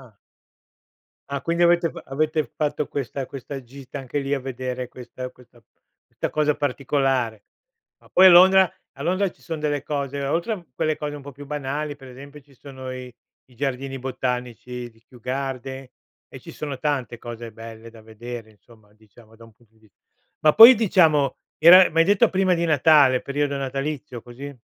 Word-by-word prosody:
ah. -, -, -46 dB, 1.1 s
Ah, 140 Hz, -1 st, -4 dB
quindi 170 Hz, +1 st, 0 dB
avete 170 Hz, -1 st, +3 dB
f -, -, -10 dB
avete 155 Hz, +2 st, -1 dB
fatto 150 Hz, -1 st, -2 dB
questa 135 Hz, -1 st, -4 dB
questa 135 Hz, +1 st, -8 dB
gita 135 Hz, +3 st, -10 dB
anche 135 Hz, +2 st, -4 dB
lì 140 Hz, 0 st, -2 dB
a 140 Hz, -, 0 dB
vedere 130 Hz, -1 st, -5 dB
questa 125 Hz, +1 st, -9 dB
questa 125 Hz, -2 st, -21 dB, 0.5 s
questa -, -, -4 dB
cosa 150 Hz, -1 st, +1 dB
particolare. 135 Hz, -5 st, -1 dB, 0.6 s
Ma -, -, -23 dB
poi 185 Hz, -, +6 dB
a -, -, +10 dB
Londra 190 Hz, +1 st, +7 dB, 0.2 s
a 140 Hz, -, -9 dB
Londra 185 Hz, +4 st, +1 dB
ci -, -, -27 dB
son 160 Hz, -2 st, -5 dB
delle 145 Hz, -2 st, -2 dB
cose 140 Hz, -1 st, -3 dB
oltre 170 Hz, +10 st, -1 dB
a 180 Hz, -5 st, -8 dB
quelle 155 Hz, +4 st, -1 dB
cose 150 Hz, -1 st, -5 dB
un 145 Hz, -, -9 dB
po' 140 Hz, +1 st, -10 dB
più 140 Hz, +2 st, -12 dB
banali, 145 Hz, +1 st, -4 dB
per 135 Hz, -2 st, -14 dB
esempio, 140 Hz, +3 st, -12 dB
ci 140 Hz, 0 st, -24 dB
sono 130 Hz, -1 st, -9 dB
i 125 Hz, -1 st, -8 dB, 0.4 s
i 125 Hz, -, -21 dB
giardini 135 Hz, +1 st, -3 dB
botanici 125 Hz, -1 st, -5 dB
di 115 Hz, 0 st, -27 dB
Kew 125 Hz, +1 st, -18 dB
Gardens 135 Hz, +1 st, -5 dB, 0.4 s
e -, -, -11 dB
ci -, -, -12 dB
sono 145 Hz, -3 st, -6 dB
tante 130 Hz, -3 st, -2 dB
cose 115 Hz, 0 st, -8 dB
belle 115 Hz, +1 st, -11 dB
da 115 Hz, -1 st, -16 dB
vedere, 115 Hz, +1 st, -9 dB
insomma, 110 Hz, -1 st, -23 dB
diciamo 110 Hz, +1 st, -21 dB
da 115 Hz, -, -16 dB
un 115 Hz, -, -19 dB
punto 110 Hz, 0 st, -30 dB
di 110 Hz, -, -29 dB
vis 110 Hz, -2 st, -25 dB, 0.5 s
ma 155 Hz, -1 st, +5 dB
poi, 230 Hz, +3 st, +10 dB
diciamo, 165 Hz, -, +3 dB, 0.2 s
era, 180 Hz, +3 st, +8 dB
m'hai 165 Hz, +1 st, +3 dB
detto, 200 Hz, +1 st, +4 dB
prima 190 Hz, -1 st, +2 dB
di 170 Hz, -1 st, -1 dB
Natale, 145 Hz, -4 st, +4 dB
periodo 140 Hz, 0 st, -2 dB
natalizio, 135 Hz, -1 st, -4 dB
così? 135 Hz, +4 st, -10 dB
135 Hz, 180 wpm, -23 LUFS, 125-150 Hz, 1.1 s, a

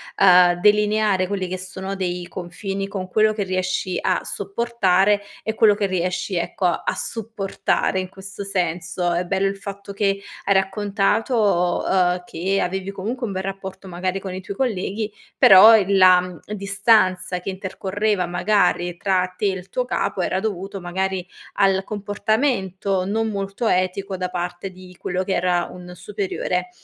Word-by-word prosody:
ehm, 180 Hz, -2 st, +6 dB
delineare 210 Hz, -2 st, +3 dB
quelli 190 Hz, -1 st, -2 dB
che 185 Hz, +1 st, -4 dB
sono 190 Hz, +1 st, -6 dB
dei 180 Hz, -2 st, -3 dB
confini 195 Hz, +2 st, -5 dB
con 195 Hz, -2 st, -5 dB
quello 215 Hz, +2 st, +3 dB
che 210 Hz, -1 st, -2 dB
riesci 185 Hz, -1 st, -1 dB
a 185 Hz, -, +1 dB
sopportare 200 Hz, -1 st, +1 dB, 0.2 s
e 220 Hz, -, -2 dB
quello 220 Hz, -2 st, +5 dB
che 205 Hz, 0 st, 0 dB
riesci, 185 Hz, +1 st, -2 dB
ecco, 175 Hz, +2 st, -2 dB
a 175 Hz, -, 0 dB
supportare 210 Hz, -3 st, -2 dB
in 185 Hz, -, -4 dB
questo 195 Hz, +1 st, -8 dB
senso. 175 Hz, -2 st, -1 dB
È 175 Hz, +1 st, -1 dB
bello 195 Hz, +2 st, 0 dB
il 195 Hz, 0 st, -3 dB
fatto 200 Hz, 0 st, -8 dB
che 200 Hz, 0 st, 0 dB, 0.2 s
hai 200 Hz, -, +3 dB
raccontato, 200 Hz, -1 st, +1 dB
uhm, 180 Hz, -1 st, +2 dB
che 190 Hz, +4 st, -1 dB
avevi 190 Hz, +1 st, -2 dB
comunque 230 Hz, +6 st, -4 dB
un 200 Hz, -, -5 dB
bel 190 Hz, 0 st, -3 dB
rapporto, 190 Hz, 0 st, -7 dB
magari, 185 Hz, +2 st, -2 dB
con 190 Hz, -1 st, -6 dB
i 185 Hz, -, -5 dB
tuoi 200 Hz, +1 st, -7 dB
colleghi, 215 Hz, -3 st, -2 dB, 0.3 s
però 205 Hz, +4 st, +9 dB
il 200 Hz, -1 st, +1 dB
la 180 Hz, -2 st, +5 dB, 0.2 s
distanza 195 Hz, -2 st, +2 dB
che 185 Hz, -, -5 dB
intercorreva, 195 Hz, +1 st, -2 dB
magari, 180 Hz, -1 st, +1 dB
tra 185 Hz, -1 st, 0 dB
te -, -, -1 dB
e 200 Hz, -, +4 dB
il 185 Hz, -1 st, -8 dB
tuo -, -, -1 dB
capo -, -, -1 dB
era 185 Hz, -, 0 dB
dovuto, 195 Hz, -1 st, -4 dB
magari, 185 Hz, +1 st, -2 dB, 0.3 s
al 195 Hz, -1 st, +3 dB
comportamento, 205 Hz, -2 st, -1 dB
non 220 Hz, +3 st, 0 dB
molto 200 Hz, +2 st, -3 dB
etico, 185 Hz, +1 st, 0 dB
da 180 Hz, 0 st, -3 dB
parte 175 Hz, +1 st, -4 dB
di 185 Hz, 0 st, -14 dB
quello 180 Hz, +1 st, -2 dB
che 190 Hz, -, -2 dB
era 175 Hz, -1 st, +1 dB
un 180 Hz, 0 st, -10 dB
superiore. 405 Hz, -, -3 dB
190 Hz, 160 wpm, -22 LUFS, 180-205 Hz, 0.3 s, però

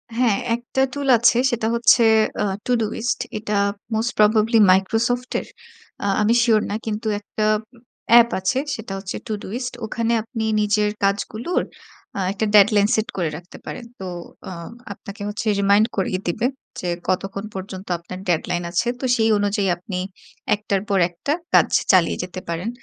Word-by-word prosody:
হ্যাঁ, 235 Hz, -4 st, +2 dB, 0.2 s
একটা 245 Hz, +2 st, -3 dB
tool 285 Hz, -1 st, -3 dB
আছে। 235 Hz, +1 st, +4 dB
সেটা 230 Hz, -2 st, -1 dB
হচ্ছে 235 Hz, 0 st, +5 dB, 0.4 s
আ -, -, +2 dB, 0.2 s
to 250 Hz, -, -1 dB
do -, -, +2 dB
list 235 Hz, +1 st, -1 dB, 0.2 s
এটা 210 Hz, 0 st, -4 dB, 0.4 s
most 225 Hz, +2 st, 0 dB
probably 215 Hz, +2 st, +4 dB
Microsoft 230 Hz, +6 st, +1 dB
এর। -, -, -9 dB, 0.6 s
আ -, -, -1 dB, 0.2 s
আমি 220 Hz, +3 st, +3 dB
sure 220 Hz, -3 st, +3 dB
না, 205 Hz, -, -2 dB
কিন্তু 220 Hz, +1 st, -3 dB
একটা 215 Hz, +1 st, -5 dB, 0.7 s
অ্যাপ 235 Hz, 0 st, +8 dB
আছে 190 Hz, +8 st, 0 dB, 0.2 s
সেটা 220 Hz, -3 st, -7 dB
হচ্ছে 190 Hz, 0 st, -6 dB
to 220 Hz, -, -2 dB
do -, -, -8 dB
list 250 Hz, 0 st, -4 dB
ওখানে 230 Hz, +1 st, -1 dB
আপনি 225 Hz, -1 st, -5 dB, 0.2 s
নিজের 210 Hz, 0 st, +2 dB
কাজগুলোর 215 Hz, -, 0 dB, 0.7 s
একটা 210 Hz, +2 st, -1 dB
আ -, -, -3 dB
deadline 205 Hz, 0 st, +6 dB
set 220 Hz, 0 st, 0 dB
করে 175 Hz, -4 st, 0 dB
রাখতে 175 Hz, +2 st, -13 dB
পারেন। 235 Hz, -, -7 dB
তো 190 Hz, -, -6 dB, 0.4 s
আ -, -, -7 dB, 0.4 s
আপনাকে 200 Hz, +1 st, -11 dB
হচ্ছে 210 Hz, +1 st, -4 dB
remind 200 Hz, +2 st, +4 dB
করিয়ে 185 Hz, -1 st, 0 dB
দিবে 215 Hz, +7 st, -1 dB, 0.3 s
যে, 180 Hz, -, -4 dB, 0.2 s
কতক্ষণ 195 Hz, +2 st, -2 dB
পর্যন্ত 190 Hz, 0 st, -7 dB
আপনার 185 Hz, +2 st, -9 dB
deadline 175 Hz, +1 st, 0 dB
আছে। 190 Hz, +7 st, 0 dB
তো 260 Hz, -, -3 dB
সেই 225 Hz, -2 st, +2 dB
অনুযায়ী 205 Hz, 0 st, 0 dB
আপনি 180 Hz, +1 st, -6 dB, 0.6 s
একটার 200 Hz, -2 st, -2 dB
পর 195 Hz, -2 st, +2 dB
একটা 175 Hz, +12 st, -4 dB, 0.2 s
কাজ -, -, +6 dB, 0.2 s
চালিয়ে 185 Hz, -4 st, +3 dB
যেতে 185 Hz, +1 st, -6 dB
পারেন। 170 Hz, +7 st, -2 dB
210 Hz, 165 wpm, -22 LUFS, 195-230 Hz, 0.7 s, অ্যাপ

